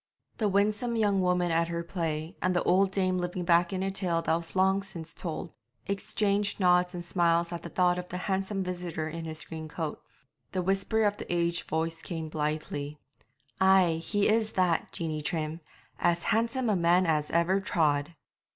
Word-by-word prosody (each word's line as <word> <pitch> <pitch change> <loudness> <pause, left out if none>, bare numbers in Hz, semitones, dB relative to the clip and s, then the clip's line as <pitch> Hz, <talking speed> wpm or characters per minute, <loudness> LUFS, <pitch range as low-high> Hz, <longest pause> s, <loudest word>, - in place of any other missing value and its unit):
The 215 -2 +2
winsome 210 +4 +1
young 205 -3 +2
woman 180 -1 +1
at 165 +1 +2
her 170 0 -3
play, 165 -2 -3
and 185 0 +1
the 175 - +2
old 190 +2 +4
dame 185 -1 0
living 180 0 -3
back 170 +1 +4
in 190 -1 -2
a 195 - -1
tale 175 -4 -1
that 160 - +2
was 165 +2 -6
long 190 +1 +3
since 170 -5 -9
told, 165 -1 -5 0.3
exchanged 200 +1 0
nods 180 -1 +3
and 175 -1 -6
smiles 170 -1 +2
at 170 - -4
the - - -7
thought 180 -1 +2
of 180 - -7
the 180 - -4
handsome 195 +1 -1
visitor 175 -3 -3
in 165 +1 -5
his 155 -1 -5
green 160 -1 -7
coat. 155 0 -4 0.5
The 185 -1 0
whisper 195 +4 +1
of 205 -1 +1
the - - -6
aged 170 0 0
voice 165 +1 -1
came 165 -3 -5
blithely 150 -1 -3 0.6
'Ay, 190 -4 +4
he 205 +3 +1
is 220 0 +2
that, 180 -3 +1
Jeanie 155 -2 -3
Trim; 155 +1 -3 0.4
as 175 0 +2
handsome 230 +3 +1
a - - +2
man 175 +1 +3
as 155 -2 +1
ever 170 +3 +2
trod!' 150 -3 +1
175 Hz, 185 wpm, -29 LUFS, 165-195 Hz, 0.6 s, old